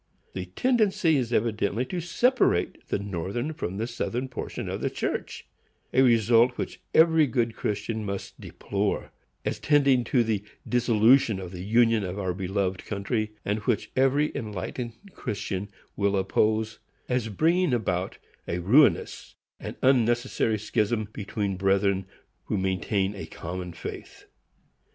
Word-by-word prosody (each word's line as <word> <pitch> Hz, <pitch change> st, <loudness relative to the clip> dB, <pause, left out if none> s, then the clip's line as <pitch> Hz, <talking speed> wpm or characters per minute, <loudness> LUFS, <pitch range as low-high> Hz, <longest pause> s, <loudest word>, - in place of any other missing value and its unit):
The 95 Hz, -1 st, -4 dB
tendency 195 Hz, -, +2 dB
is 125 Hz, -3 st, -1 dB
evidently 110 Hz, 0 st, 0 dB
to 175 Hz, +6 st, -4 dB
separate 210 Hz, -, +1 dB
the -, -, 0 dB
Northern 100 Hz, -, -3 dB
from 95 Hz, -, -4 dB
the 110 Hz, -, -1 dB
Southern 120 Hz, +2 st, -3 dB
portion 125 Hz, -, -5 dB
of -, -, -4 dB
the -, -, 0 dB
church,—a 130 Hz, -, -4 dB
result 120 Hz, 0 st, +4 dB
which -, -, -5 dB
every 160 Hz, -2 st, +6 dB
good 115 Hz, -2 st, 0 dB
Christian 105 Hz, +2 st, -2 dB
must 100 Hz, -1 st, -6 dB
deplore, 100 Hz, 0 st, -2 dB, 0.3 s
as -, -, -2 dB
tending 140 Hz, -4 st, +4 dB
to 120 Hz, +1 st, +3 dB
the 110 Hz, -3 st, -1 dB, 0.2 s
dissolution 120 Hz, -2 st, +4 dB
of 90 Hz, -2 st, -7 dB
the 90 Hz, -1 st, -7 dB
Union 115 Hz, +1 st, +3 dB
of 95 Hz, +1 st, -4 dB
our 95 Hz, -3 st, -1 dB
beloved 95 Hz, 0 st, -2 dB
country, 110 Hz, +1 st, -2 dB
and 105 Hz, +2 st, 0 dB
which 105 Hz, -, -1 dB
every 135 Hz, +3 st, +3 dB
enlightened 110 Hz, +3 st, -4 dB, 0.2 s
Christian 100 Hz, -3 st, -4 dB, 0.3 s
will 100 Hz, -1 st, +1 dB
oppose, 110 Hz, +3 st, +1 dB, 0.3 s
as 125 Hz, -3 st, 0 dB
bringing 165 Hz, -, +2 dB
about 95 Hz, -6 st, -1 dB, 0.3 s
a 85 Hz, -, -1 dB
ruinous 120 Hz, -, +3 dB, 0.2 s
and -, -, -6 dB
unnecessary 120 Hz, -3 st, +2 dB
schism 110 Hz, 0 st, -1 dB
between 100 Hz, -1 st, -3 dB
brethren 95 Hz, 0 st, +1 dB, 0.4 s
who -, -, -1 dB
maintain 95 Hz, +1 st, 0 dB
a 90 Hz, -6 st, -7 dB
common 90 Hz, +2 st, -6 dB
faith. 85 Hz, -, -9 dB
110 Hz, 135 wpm, -26 LUFS, 100-125 Hz, 0.4 s, every